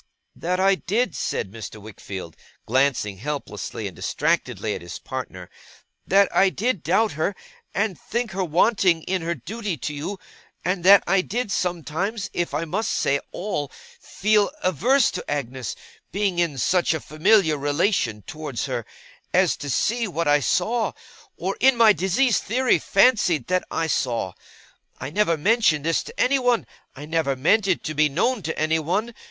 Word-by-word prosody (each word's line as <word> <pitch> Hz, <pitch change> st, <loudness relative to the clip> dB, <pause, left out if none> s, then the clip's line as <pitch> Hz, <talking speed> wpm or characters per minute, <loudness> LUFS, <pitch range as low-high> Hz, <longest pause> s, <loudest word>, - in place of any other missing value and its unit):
' -, -, -52 dB
that 180 Hz, +1 st, +1 dB
I 195 Hz, +1 st, +5 dB
did,' 210 Hz, +2 st, -1 dB
said 95 Hz, -, -2 dB
Mr. 110 Hz, 0 st, -8 dB
Wickfield, 100 Hz, -5 st, -8 dB, 0.3 s
glancing 125 Hz, -5 st, +1 dB
helplessly 115 Hz, -6 st, -5 dB
and 95 Hz, -4 st, -6 dB
distractedly 125 Hz, -, -1 dB
at -, -, -6 dB
his 85 Hz, 0 st, -7 dB
partner, 110 Hz, -9 st, -7 dB, 0.6 s
'that 200 Hz, 0 st, +3 dB
I 195 Hz, -, +5 dB
did 220 Hz, -1 st, -1 dB
doubt 190 Hz, +8 st, +2 dB
her, 160 Hz, +6 st, -1 dB, 0.4 s
and 200 Hz, -3 st, -1 dB
think 235 Hz, -1 st, -3 dB
her 190 Hz, +1 st, -2 dB
wanting 180 Hz, 0 st, +2 dB
in 185 Hz, +1 st, -1 dB
her 170 Hz, +1 st, -2 dB
duty 200 Hz, -, -5 dB
to 150 Hz, +4 st, -4 dB
you; 155 Hz, +8 st, -5 dB, 0.5 s
and 180 Hz, 0 st, -1 dB
that 200 Hz, +1 st, +8 dB
I 195 Hz, +1 st, +3 dB
did 225 Hz, +3 st, -3 dB
sometimes, 180 Hz, +4 st, -2 dB
if 175 Hz, -, -1 dB
I 150 Hz, +4 st, -2 dB
must 200 Hz, +7 st, -2 dB
say 140 Hz, 0 st, +1 dB
all, 160 Hz, -7 st, -3 dB, 0.3 s
feel 210 Hz, 0 st, +1 dB
averse 235 Hz, -, +3 dB
to -, -, -6 dB
Agnes 130 Hz, -5 st, -3 dB, 0.4 s
being 195 Hz, -2 st, 0 dB
in 165 Hz, -5 st, 0 dB
such 175 Hz, +6 st, +2 dB
a -, -, -2 dB
familiar 160 Hz, +2 st, +3 dB
relation 145 Hz, -, 0 dB
towards 150 Hz, -3 st, -5 dB
her, -, -, -4 dB, 0.5 s
as 185 Hz, -2 st, +4 dB
to 145 Hz, -, -6 dB
see 230 Hz, -, +1 dB
what 170 Hz, -3 st, -2 dB
I 145 Hz, 0 st, +5 dB
saw, 220 Hz, -, 0 dB, 0.4 s
or 190 Hz, +2 st, -2 dB
in 265 Hz, -1 st, +5 dB
my 225 Hz, -2 st, +7 dB
diseased 195 Hz, +4 st, +2 dB
theory 250 Hz, +4 st, +2 dB
fancied 185 Hz, -, +3 dB
that 185 Hz, 0 st, +1 dB
I 165 Hz, -, -1 dB
saw. 120 Hz, -, -1 dB, 0.7 s
I 135 Hz, +2 st, -5 dB
never 170 Hz, -3 st, +2 dB
mentioned 165 Hz, -4 st, +2 dB
this 165 Hz, 0 st, +2 dB
to 465 Hz, +2 st, -11 dB
anyone. 250 Hz, -3 st, +2 dB, 0.3 s
I 145 Hz, -, -8 dB
never 155 Hz, -3 st, 0 dB
meant 195 Hz, +10 st, +2 dB
it 185 Hz, -, +1 dB
to 155 Hz, -, -3 dB
be 155 Hz, 0 st, +3 dB
known 215 Hz, -, 0 dB
to 160 Hz, -1 st, -4 dB
anyone. 160 Hz, +9 st, 0 dB
170 Hz, 165 wpm, -23 LUFS, 145-205 Hz, 0.7 s, that